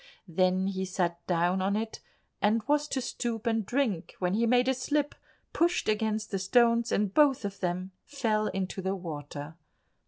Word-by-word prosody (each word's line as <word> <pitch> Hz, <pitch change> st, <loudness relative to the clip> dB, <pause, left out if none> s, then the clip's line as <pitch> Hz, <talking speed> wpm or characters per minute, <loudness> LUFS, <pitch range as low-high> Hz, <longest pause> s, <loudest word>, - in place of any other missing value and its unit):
Then 185 Hz, +2 st, +2 dB
he 190 Hz, -1 st, -2 dB
sat 175 Hz, -2 st, -2 dB
down 175 Hz, +1 st, +2 dB
on 195 Hz, +2 st, +1 dB
it, 220 Hz, +1 st, -3 dB, 0.4 s
and 215 Hz, +2 st, +2 dB
was 295 Hz, 0 st, +1 dB
to 270 Hz, -, -1 dB
stoop 235 Hz, -2 st, -3 dB
and 225 Hz, -1 st, +1 dB
drink, 225 Hz, -6 st, -1 dB
when 180 Hz, 0 st, 0 dB
he 230 Hz, +3 st, +2 dB
made 250 Hz, +1 st, +4 dB
a 265 Hz, -, +4 dB
slip, 290 Hz, +3 st, -1 dB, 0.4 s
pushed 345 Hz, +1 st, +2 dB
against 215 Hz, 0 st, 0 dB
the 195 Hz, -, -1 dB
stones, 235 Hz, +4 st, +3 dB
and 205 Hz, -2 st, +1 dB
both 280 Hz, -7 st, +4 dB
of 200 Hz, 0 st, -5 dB
them 185 Hz, +1 st, -2 dB
fell 220 Hz, -7 st, 0 dB
into 190 Hz, 0 st, -3 dB
the 190 Hz, +1 st, -1 dB
water. 150 Hz, -3 st, -7 dB
210 Hz, 175 wpm, -29 LUFS, 185-235 Hz, 0.4 s, made